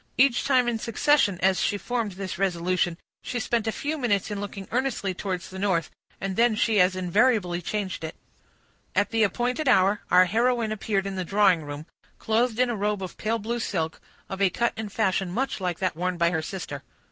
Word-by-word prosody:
Each 255 -2 +4
time 255 -3 +3
in 235 -2 0
succession, 230 -3 +2
as 190 0 +3
she 205 - +1
formed 230 -2 -2
this 185 -1 -6
resolution, 180 -2 0 0.2
she 245 - -3
spent 230 -1 -1
a - - +2
few 300 +6 -3
minutes 210 -5 0
in 205 -1 -3
looking 195 -1 -6
earnestly 245 -6 -1
towards 185 -1 -4
the 190 - -7
north, 185 -5 0 0.3
and 195 -1 -3
then 235 0 +3
she 215 -2 +3
as 185 +1 +3
invariably 185 -1 +2
changed 190 -1 -3
it. 160 - -5 0.8
At - - +2
the 225 -1 +1
appointed 245 - +1
hour, 195 -2 +4
our 180 +1 +6
heroine 230 +3 +1
appeared 205 -2 -1
in 195 -1 -4
the 185 - -1
drawing 195 -2 +3
room, 145 0 -7 0.3
clothed 225 +1 0
in 250 -1 +3
a - - -2
robe 205 -1 -1
of 185 - -7
pale 225 +2 0
blue 230 +2 -3
silk, 165 -8 -2 0.3
of 190 +1 -6
a 195 - +5
cut 235 +6 0
and 215 -2 -5
fashion 195 -3 0
much 250 0 -2
like 180 -2 -1
that 185 -3 -1
worn 180 +2 -2
by 170 0 +3
her 160 -2 0
sister. 155 -4 -6
200 Hz, 205 wpm, -26 LUFS, 185-230 Hz, 0.8 s, our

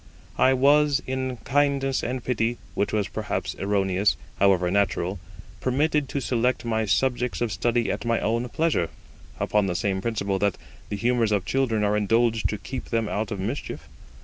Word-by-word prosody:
I 130 - +5
was, 145 +1 +4
in 130 -1 -2
kindness 140 -1 +1
and 125 0 -3
pity, 120 -1 0 0.2
which 100 - 0
was 105 -2 0
perhaps - - -3
erroneous, 95 -4 +1 0.2
however 95 -3 +3
natural, 100 -1 0 0.4
permitted 145 +2 +1
to 140 - -2
select 125 -1 0
my 110 -1 0
subjects 125 +2 0
of 120 -2 -1
study 120 +1 +1
at - - -3
my 115 -1 +1
own 115 +3 -1
pleasure, 155 - +1 0.5
upon 105 -2 +1
the 90 - -2
same 95 +1 -1
principle 100 -3 -1
that 100 -1 +1 0.3
the - - -2
humours 115 0 +1
of 100 -3 +1
children 115 -3 +1
are 105 0 +2
indulged 115 +2 +2
to 105 - -2
keep 130 +5 -6
them 115 -2 -1
out 105 0 -2
of 100 - -4
mischief. 115 +9 -4
115 Hz, 170 wpm, -25 LUFS, 100-130 Hz, 0.5 s, I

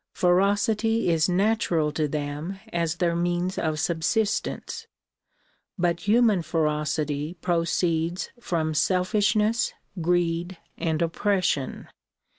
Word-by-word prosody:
Ferocity 205 +4 +2
is 165 +1 +2
natural 180 -5 +1
to 155 0 0
them 150 +5 -4
as 170 -1 0
their 170 -1 0
means 175 +2 -1
of 155 -1 -1
subsistence; 200 +7 -1 0.9
but 175 +1 -1
human 220 -3 +4
ferocity 150 -1 -1
proceeds 170 0 0
from 160 -8 -1
selfishness, 210 +7 +2 0.3
greed 175 +1 0 0.2
and 160 0 -1
oppression. 180 -4 -1
175 Hz, 90 wpm, -25 LUFS, 160-195 Hz, 0.9 s, human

